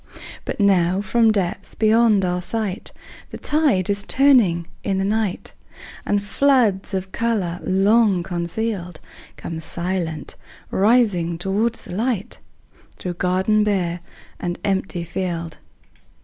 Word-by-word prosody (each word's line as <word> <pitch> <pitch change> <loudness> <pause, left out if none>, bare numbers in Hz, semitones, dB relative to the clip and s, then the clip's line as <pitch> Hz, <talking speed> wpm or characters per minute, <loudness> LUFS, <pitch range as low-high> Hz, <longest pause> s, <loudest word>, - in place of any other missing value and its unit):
But - - -4
now 185 -2 +3
from 225 +3 +3
depths 190 -5 -2
beyond 220 -2 +4
our 180 0 -1
sight, 210 -1 -3 0.4
The - - -8
tide 290 - +2
is 200 0 0
turning 240 -12 +3 0.2
in 195 -2 -1
the 190 - 0
night, 210 -2 -2 0.5
And 205 -1 +1
floods 215 -4 +2
of 190 0 -4
color 205 -7 -1
long 195 0 +3
concealed 180 0 -3 0.4
Come 165 -1 -6
silent 170 -1 -4 0.4
rising 195 -6 +2
toward 205 +6 0
the - - -5
light, 220 0 -2 0.6
Through 180 - -4
garden 185 +4 +1
bare 180 -4 0 0.4
and 175 0 -3
empty 190 -3 -1
field. 170 -2 -4
195 Hz, 120 wpm, -21 LUFS, 180-220 Hz, 0.6 s, beyond